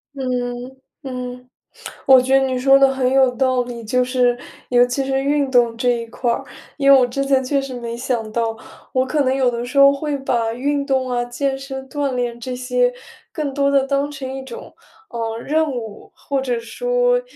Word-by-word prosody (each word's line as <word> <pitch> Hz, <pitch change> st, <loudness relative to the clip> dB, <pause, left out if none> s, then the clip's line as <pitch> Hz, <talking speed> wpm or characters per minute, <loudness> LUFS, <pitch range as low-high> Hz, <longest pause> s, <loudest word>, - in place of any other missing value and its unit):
嗯， 250 Hz, -1 st, -4 dB, 0.2 s
嗯， 250 Hz, -2 st, -7 dB, 0.6 s
我 265 Hz, -2 st, +7 dB
觉 260 Hz, +1 st, 0 dB
得 270 Hz, -, +1 dB
你 260 Hz, -1 st, -1 dB
说 270 Hz, +2 st, +5 dB
得 275 Hz, -, +6 dB
很 260 Hz, -1 st, 0 dB
有 265 Hz, -1 st, +5 dB
道 255 Hz, -1 st, +2 dB
理， 240 Hz, -1 st, -8 dB
就 250 Hz, +3 st, +1 dB
是， 250 Hz, -1 st, +1 dB, 0.3 s
尤 245 Hz, 0 st, +5 dB
其 245 Hz, +2 st, -2 dB
是 270 Hz, 0 st, 0 dB
运 280 Hz, -1 st, 0 dB
动 240 Hz, -2 st, +3 dB
这 245 Hz, +1 st, +1 dB
一 235 Hz, -1 st, -1 dB
块 235 Hz, +1 st, -1 dB
儿。 -, -, -3 dB, 0.3 s
因 275 Hz, -2 st, +3 dB
为 275 Hz, -, +9 dB
我 255 Hz, -, +4 dB
之 275 Hz, +3 st, -2 dB
前 270 Hz, -1 st, +2 dB
确 275 Hz, +1 st, 0 dB
实 270 Hz, -1 st, -7 dB
没 235 Hz, -1 st, -5 dB
想 235 Hz, -3 st, -2 dB
到， 225 Hz, -1 st, -1 dB, 0.4 s
我 255 Hz, 0 st, +2 dB
可 295 Hz, +3 st, 0 dB
能 260 Hz, 0 st, +1 dB
有 260 Hz, -2 st, +2 dB
的 235 Hz, 0 st, -4 dB
时 255 Hz, +3 st, -6 dB
候 275 Hz, 0 st, +8 dB
会 285 Hz, 0 st, -2 dB
把 235 Hz, -4 st, -1 dB
运 280 Hz, +3 st, -1 dB
动 260 Hz, -2 st, 0 dB
啊、 240 Hz, 0 st, 0 dB
健 270 Hz, +2 st, -2 dB
身 265 Hz, -1 st, -7 dB
锻 280 Hz, -2 st, -2 dB
炼 240 Hz, -1 st, -2 dB
这 250 Hz, +1 st, -5 dB
些， 250 Hz, 0 st, +1 dB, 0.4 s
更 295 Hz, -4 st, -3 dB
多 280 Hz, 0 st, +2 dB
地 275 Hz, -1 st, +3 dB
当 280 Hz, +1 st, 0 dB
成 270 Hz, -2 st, -6 dB
一 270 Hz, -, -5 dB
种， 470 Hz, -, -10 dB, 0.4 s
呃， 225 Hz, -1 st, -4 dB
任 310 Hz, +5 st, 0 dB
务， 230 Hz, -6 st, -7 dB
或 280 Hz, -1 st, -3 dB
者 250 Hz, -2 st, -1 dB
说， -, -, +1 dB
260 Hz, 220 characters per minute, -20 LUFS, 245-275 Hz, 0.6 s, 为